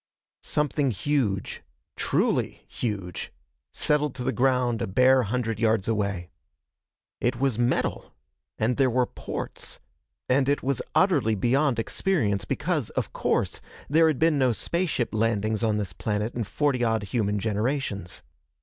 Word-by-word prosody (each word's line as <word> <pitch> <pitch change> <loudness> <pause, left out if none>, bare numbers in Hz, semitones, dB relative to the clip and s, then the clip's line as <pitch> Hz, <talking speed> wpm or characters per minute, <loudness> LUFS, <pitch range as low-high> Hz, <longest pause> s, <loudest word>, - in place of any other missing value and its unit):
Something 150 -1 0
huge 110 -3 -1 0.3
truly - - 0
huge! 100 -7 -4 0.4
settled 150 -2 +1
to 125 - -4
the - - +1
ground 125 -2 +1
a - - -1
bare 130 +7 +5
hundred 115 0 -2
yards 110 -3 +2
away. 100 -5 -1 0.9
It 120 - +1
was 135 -4 +1
metal, 120 +1 0 0.5
and 115 +3 +1
there 135 -2 +4
were 125 +1 +2
ports, - - -6 0.5
and 135 +1 +3
it 145 - +1
was 135 +1 0
utterly 145 - +3
beyond 130 +5 +2
experience, 115 - 0
because, 150 - -1
of - - -3
course, - - 0 0.3
there 160 +3 +5
had 155 -4 +1
been 160 -1 +3
no 130 -2 +3
spaceship 170 -2 -1
landings 110 0 0
on 110 -2 +2
this 100 -4 -3
planet 105 +3 -2
in 120 -2 -2
forty 140 +1 0
odd 110 -2 +1
human 105 -1 0
generations. 105 - -2
120 Hz, 140 wpm, -26 LUFS, 105-140 Hz, 0.9 s, bare